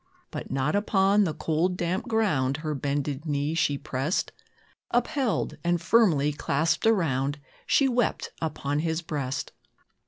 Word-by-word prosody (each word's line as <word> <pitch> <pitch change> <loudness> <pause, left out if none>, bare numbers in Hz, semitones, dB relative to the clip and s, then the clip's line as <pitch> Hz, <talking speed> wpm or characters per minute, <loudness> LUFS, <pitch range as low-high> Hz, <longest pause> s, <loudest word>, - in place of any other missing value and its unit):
But - - -6
not 135 +5 0
upon 205 0 +3
the 160 - -1
cold, 170 +3 0
damp 180 +6 -2
ground, 155 - +1
Her 155 - 0
bended 145 +1 -2
knee 145 +1 0
she 145 -3 +1
pressed; 140 +6 -2 0.6
Upheld, 245 0 0
and 175 0 +1
firmly 165 -7 +3
clasped 155 +7 0
around, 145 - +1 0.3
She 275 - +4
wept 245 -3 0
upon 145 -2 -2
his 160 +1 -1
breast. 140 -4 -3
160 Hz, 130 wpm, -27 LUFS, 145-195 Hz, 0.6 s, She